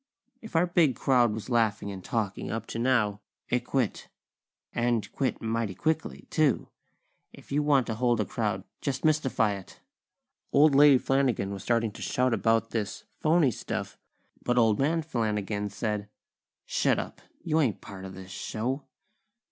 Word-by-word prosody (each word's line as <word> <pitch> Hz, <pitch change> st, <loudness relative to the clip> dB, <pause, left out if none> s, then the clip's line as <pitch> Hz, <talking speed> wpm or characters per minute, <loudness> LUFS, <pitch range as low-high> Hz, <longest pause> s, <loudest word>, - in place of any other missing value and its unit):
If 220 Hz, -5 st, -11 dB
our 165 Hz, +2 st, +5 dB
big 170 Hz, -7 st, +3 dB
crowd 125 Hz, -3 st, +3 dB
was 110 Hz, 0 st, -5 dB
laughing 110 Hz, -3 st, +1 dB
and 95 Hz, -2 st, -8 dB
talking 105 Hz, -3 st, -2 dB
up 115 Hz, 0 st, -3 dB
to -, -, -3 dB
now, 115 Hz, -5 st, +2 dB, 0.3 s
it 125 Hz, -, +2 dB
quit! 130 Hz, -6 st, -1 dB, 0.7 s
And 120 Hz, -2 st, +1 dB
quit 130 Hz, -5 st, -2 dB
mighty 115 Hz, -3 st, -1 dB
quickly, 160 Hz, 0 st, -2 dB
too! 155 Hz, -6 st, +2 dB, 0.6 s
If -, -, -16 dB
you 145 Hz, +2 st, +2 dB
want 145 Hz, -4 st, +3 dB
to 110 Hz, -, -2 dB
hold 120 Hz, +1 st, +1 dB
a 105 Hz, -, +1 dB
crowd, -, -, -2 dB, 0.2 s
just 135 Hz, +1 st, -2 dB
mystify 135 Hz, -9 st, +2 dB
it. 95 Hz, -2 st, -10 dB, 0.7 s
Old 150 Hz, +1 st, +6 dB
Lady 140 Hz, -1 st, +7 dB
Flanagan 125 Hz, -7 st, +1 dB
was 100 Hz, -, -6 dB
starting 115 Hz, 0 st, +1 dB
to -, -, -11 dB
shout 125 Hz, -1 st, +1 dB
about 115 Hz, 0 st, +2 dB
"this 110 Hz, -3 st, -3 dB, 0.2 s
phony 155 Hz, -3 st, +4 dB
stuff," -, -, -4 dB, 0.5 s
but 125 Hz, 0 st, 0 dB
Old 110 Hz, -3 st, +4 dB
Man 160 Hz, +4 st, +1 dB
Flanagan 105 Hz, -7 st, -2 dB
said: 105 Hz, 0 st, -3 dB, 0.6 s
"Shut -, -, +2 dB
up! -, -, -5 dB, 0.2 s
You 160 Hz, -1 st, +1 dB
ain't 125 Hz, -, +1 dB
part 95 Hz, -1 st, -10 dB
of 95 Hz, 0 st, -8 dB
this 95 Hz, 0 st, -10 dB
show!" 125 Hz, +8 st, -3 dB
120 Hz, 160 wpm, -28 LUFS, 105-140 Hz, 0.7 s, Lady